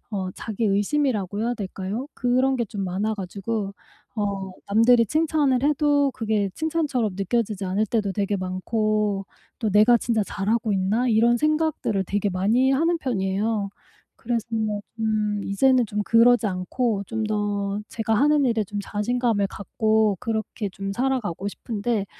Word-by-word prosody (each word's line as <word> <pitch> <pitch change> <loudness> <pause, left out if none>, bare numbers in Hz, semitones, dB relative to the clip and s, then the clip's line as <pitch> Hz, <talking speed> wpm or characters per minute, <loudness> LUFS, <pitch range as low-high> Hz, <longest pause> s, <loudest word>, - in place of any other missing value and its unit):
어 190 -3 -3
자기 220 0 -4
의심이라고 205 -1 0
해야 235 +2 0
될까요? 200 +3 -4
그런 255 +2 +2
게 235 - 0
좀 200 -2 -5
많아 200 +4 -1
가지고 200 +1 -4 0.4
어 200 -3 -3 0.2
남들이 230 +3 +5
칭찬을 295 -2 +1
해도 290 -1 +3
그게 215 -4 0
칭찬처럼 295 - -1
느껴지지 205 0 -1
않을 195 +4 0
때도 210 -2 0
되게 200 0 -1
많고 200 +2 -1 0.3
또 225 - -1
'내가 215 +4 +6
진짜 230 -1 0
잘하고 215 +3 -1
있나?' 200 +6 +1
이런 235 +1 +4
생각들을 305 -9 0
되게 205 +2 -1
많이 220 +9 +2
하는 330 +5 +2
편이에요. 205 -4 -1 0.4
그래서 230 -1 -3 0.5
좀 215 -2 0
이제는 250 +4 +3
좀 210 0 -2
그러지 235 +1 +5
않고 200 +3 -1
좀 225 -1 -2
더 205 -1 -1
제가 225 0 -1
하는 290 +4 +3
일에 230 -3 +2
좀 205 +1 -5
자신감을 210 0 0
갖고 215 +1 +1
그렇게 220 -1 -3
좀 195 +1 -5
살아가고 225 -6 -1
싶은데 210 0 -2
215 Hz, 310 characters per minute, -24 LUFS, 200-245 Hz, 0.5 s, 내가